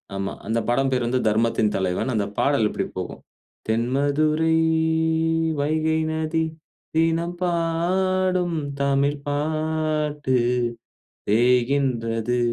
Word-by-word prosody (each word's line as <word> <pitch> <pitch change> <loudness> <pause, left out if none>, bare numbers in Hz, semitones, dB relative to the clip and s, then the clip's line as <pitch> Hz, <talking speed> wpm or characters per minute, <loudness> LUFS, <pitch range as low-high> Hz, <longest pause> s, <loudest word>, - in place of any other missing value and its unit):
ஆமா. 95 0 -3
அந்த 115 +1 +1
படம் 135 +3 +2
பெயர் 125 -2 +1
வந்து 125 +2 +1
'தர்மத்தின் 110 0 +2
தலைவன்.' 95 +6 -1
அந்த 105 -3 0
பாடல் 140 -6 +2
இப்டி - - -2
போகும். - - -5 0.5
"தென்மதுரை 145 +7 +1 1.1
வைகை 155 +2 +1
நதி, 160 +1 0 0.5
தினம் 165 +2 +1
பாடும், 180 +1 0 0.2
தமிழ் 140 +1 +1
பாட்டு. 150 -2 -1 0.9
பேய்கின்றது 120 0 +1
145 Hz, 90 wpm, -23 LUFS, 120-160 Hz, 1.1 s, படம்